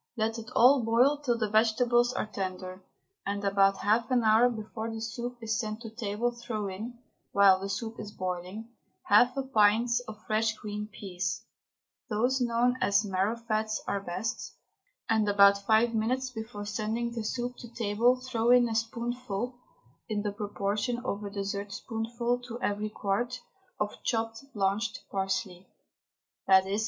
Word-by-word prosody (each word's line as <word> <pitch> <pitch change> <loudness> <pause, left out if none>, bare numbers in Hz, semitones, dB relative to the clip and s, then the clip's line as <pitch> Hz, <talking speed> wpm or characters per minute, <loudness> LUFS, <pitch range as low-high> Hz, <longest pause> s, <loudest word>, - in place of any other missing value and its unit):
Let 225 +1 0
it 220 - -9
all 255 +1 +6
boil 245 +6 +3
till 245 -5 0
the 220 -2 0
vegetables 240 +2 +3
are 250 - -2
tender, 185 -2 -5 0.4
and 200 0 -3
about 195 0 +4
half 225 +4 +2
an 250 -2 +3
hour 220 +3 +5
before 220 0 -5
the 225 0 -5
soup 240 +2 -5
is 220 0 0
sent 215 -1 -4
to 225 -2 -8
table 225 +1 -1
throw 235 -3 -4
in, 220 +6 -6 0.4
while 195 -2 +6
the 195 +1 -4
soup 225 +2 -4
is 210 -1 -6
boiling, 185 +4 -5 0.3
half 245 +5 +5
a 270 - 0
pint 225 -2 +3 0.2
of 215 0 -10
fresh 220 0 +1
green 210 0 -5
peas 185 -2 -4 0.7
those 245 +5 +1
known 245 +1 +2
as 200 +1 +3
marrowfats 215 +3 -1
are 200 - -1
best, 190 +4 -4 0.5
and 220 -2 +2
about 200 0 +5
five 225 +2 +4
minutes 255 +4 0
before 220 -3 -6
sending 220 +3 -2
the 235 -2 -4
soup 245 +3 -3
to 235 - -10
table 235 +2 +2
throw 240 -3 -1
in 245 -1 +6
a - - -2
spoonful 235 +1 -3 0.5
(in 210 -1 -1
the 205 - -1
proportion 205 +3 -2
of 205 -2 -2
a 200 - -4
dessertspoonful 225 +4 -3
to 245 -1 -8
every 210 -1 -1
quart) 230 +5 -2 0.4
of 210 0 -3
chopped, 225 -1 -1
blanched 205 +3 0
parsley 190 -1 -2 0.8
_i.e. 190 +2 +5
220 Hz, 155 wpm, -29 LUFS, 205-235 Hz, 0.8 s, all